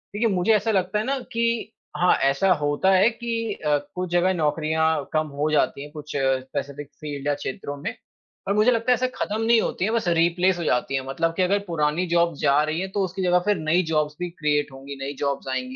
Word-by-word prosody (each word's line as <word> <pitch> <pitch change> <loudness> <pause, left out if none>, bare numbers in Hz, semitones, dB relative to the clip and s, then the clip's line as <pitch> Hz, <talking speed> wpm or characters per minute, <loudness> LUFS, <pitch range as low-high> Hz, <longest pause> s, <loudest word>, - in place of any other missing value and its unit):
देखिए 230 +3 +2
मुझे 180 +5 +3
ऐसा 210 +2 +1
लगता 190 0 0
है 215 - -2
ना 275 +1 -1
कि 230 -1 -1 0.3
हाँ, 180 +1 +4
ऐसा 140 +8 +2
होता 150 +4 +1
है 195 +4 +5
कि 230 -2 -3
अ, 150 -5 0 0.2
कुछ 180 0 -3
जगह 175 +2 +3
नौकरियाँ 160 -1 0
कम 155 0 +1
हो 155 +1 +1
जाती 150 -2 +1
हैं 145 +1 -9
कुछ 150 -1 -9
स्पेसिफिक 135 +1 -2
फील्ड 145 -2 -5
या 145 - +3
क्षेत्रों 140 +2 -5
में। 180 +12 -4 0.5
पर 200 - 0
मुझे 215 +4 +4
लगता 230 +1 +1
है - - +8
ऐसे 255 +1 0
खत्म 215 +2 -2
नहीं 230 +1 +4
होती 190 - -1
हैं, 220 - -1
बस 230 -5 0
रिप्लेस 175 +2 +2
हो 170 - -3
जाती 130 -1 0
हैं। 135 - 0
मतलब 165 +5 -1
कि - - +2
अगर 200 +3 +2
पुरानी 160 +1 0
जॉब्स 170 -2 +1
जा 140 +2 +3
रही 155 +2 -2
हैं 190 - -4
तो 200 0 0
उसकी 185 +1 -5
जगह 180 0 +4
फिर 210 -1 +2
नई 160 +3 +1
जॉब्स 150 -1 0
भी 180 0 -3
क्रिएट 150 -3 -1
होंगी, 135 +1 -9
नई 140 +1 -4
जॉब्स 140 -1 -2
आएँगी। 130 0 -3
170 Hz, 230 wpm, -24 LUFS, 145-195 Hz, 0.5 s, है